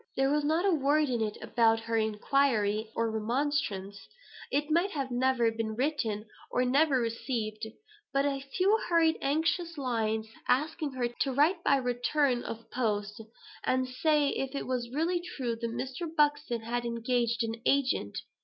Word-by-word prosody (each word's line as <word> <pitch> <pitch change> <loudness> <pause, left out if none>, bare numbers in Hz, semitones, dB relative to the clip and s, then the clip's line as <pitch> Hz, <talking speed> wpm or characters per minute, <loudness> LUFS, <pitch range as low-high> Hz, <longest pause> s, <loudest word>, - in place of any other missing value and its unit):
There 270 +1 +3
was 295 0 +2
not 320 +5 +1
a 395 - +4
word 295 0 +2
in 240 -2 0
it 215 -1 -2
about 225 -1 +3
her 230 0 -3
inquiry 220 -1 +1
or 230 -1 0
remonstrance; 220 -4 -2 0.4
it 295 +2 -1
might 340 +5 +3 0.2
never 250 -1 +2
have 225 0 +1
been 220 -1 -2
written, 235 -6 -1 0.2
or 250 - +1
never 275 +1 +3
received; 225 -2 -3 0.4
but 275 +1 +2
a 280 -1 0 0.2
few 400 +4 +4
hurried 330 -2 +3
anxious 325 +4 0
lines, 220 -4 -1 0.2
asking 300 +2 0
her 250 -2 0
to 240 +3 -2
write 320 +7 +2
by 280 - +4
return 250 +1 +1
of 230 -1 -7
post, 210 -3 -1 0.4
and 255 0 +1
say 295 +3 +2
if 270 0 -3
it - - -3
was 250 -2 -2
really 330 +6 0
true 260 -9 -3
that 230 0 -3
Mr. 260 +7 -4
Buxton 290 -6 +2
had 240 +2 -2
engaged 235 0 0
an 225 0 -4
agent. 260 - +1
255 Hz, 160 wpm, -30 LUFS, 230-290 Hz, 0.4 s, a